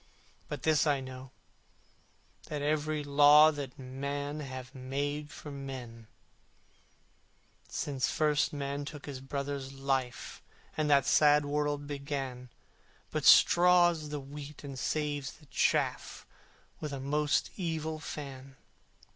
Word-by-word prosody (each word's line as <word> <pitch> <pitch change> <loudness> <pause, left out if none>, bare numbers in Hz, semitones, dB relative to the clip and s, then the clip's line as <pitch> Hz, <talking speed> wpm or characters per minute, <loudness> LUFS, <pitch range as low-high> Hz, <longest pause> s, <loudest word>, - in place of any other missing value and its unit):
But 145 -3 -5
this 155 -1 +3
I 145 -2 +2
know, 130 0 -9 1.2
that 150 -2 -4
every 155 0 0
Law 145 +2 +7
That 140 -4 -7
men 140 +3 -4
have 130 -2 -7
made 145 +3 -3
for 145 0 -9
Man, 130 -5 -8 1.6
Since 135 -3 -2
first 150 -1 +2
Man 140 0 -3
took 145 0 -8
His 140 -3 -6
brother's 140 0 -4
life, 135 -2 -2 0.3
And 155 -1 0
the 140 -2 +5
sad 150 +1 +5
world 145 0 -1
began, 140 -3 -5 0.6
But - - -2
straws 175 -3 +6
the 150 0 -3
wheat 145 +2 -9
and 140 -2 -7
saves 145 -2 -2
the 150 - -19
chaff - - 0 0.5
With 150 -2 -5
a 135 - -4
most 150 +2 0
evil 160 -3 -3
fan. 135 -3 -8
145 Hz, 120 wpm, -31 LUFS, 135-150 Hz, 1.6 s, Law